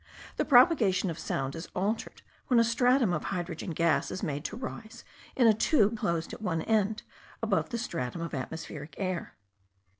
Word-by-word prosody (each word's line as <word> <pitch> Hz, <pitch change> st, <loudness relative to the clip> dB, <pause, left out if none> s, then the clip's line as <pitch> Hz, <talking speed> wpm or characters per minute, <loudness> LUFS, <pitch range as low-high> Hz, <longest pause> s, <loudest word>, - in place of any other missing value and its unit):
The -, -, +1 dB
propagation 245 Hz, -, +5 dB
of 165 Hz, -, -7 dB
sound 135 Hz, 0 st, -2 dB
is 165 Hz, +2 st, -7 dB
altered 205 Hz, +5 st, -2 dB, 0.2 s
when 245 Hz, -3 st, +4 dB
a -, -, +6 dB
stratum 245 Hz, -2 st, +3 dB
of 155 Hz, -, -2 dB
hydrogen 175 Hz, -2 st, -4 dB
gas 165 Hz, 0 st, +1 dB
is 185 Hz, -, -5 dB
made 145 Hz, -4 st, -2 dB
to -, -, -4 dB
rise 230 Hz, -3 st, -7 dB, 0.3 s
in 250 Hz, -, +4 dB
a 225 Hz, -, +7 dB
tube 220 Hz, -1 st, +3 dB
closed 170 Hz, -6 st, -2 dB
at -, -, -8 dB
one 170 Hz, -6 st, -1 dB
end 215 Hz, -1 st, +1 dB, 0.4 s
above -, -, 0 dB
a 235 Hz, -, -1 dB
stratum 170 Hz, -, -4 dB
of 165 Hz, -, -5 dB
atmospheric 145 Hz, +2 st, -6 dB
air; 185 Hz, -3 st, -1 dB
and -, -, -10 dB
M. -, -, -21 dB
190 Hz, 185 wpm, -29 LUFS, 165-230 Hz, 0.4 s, a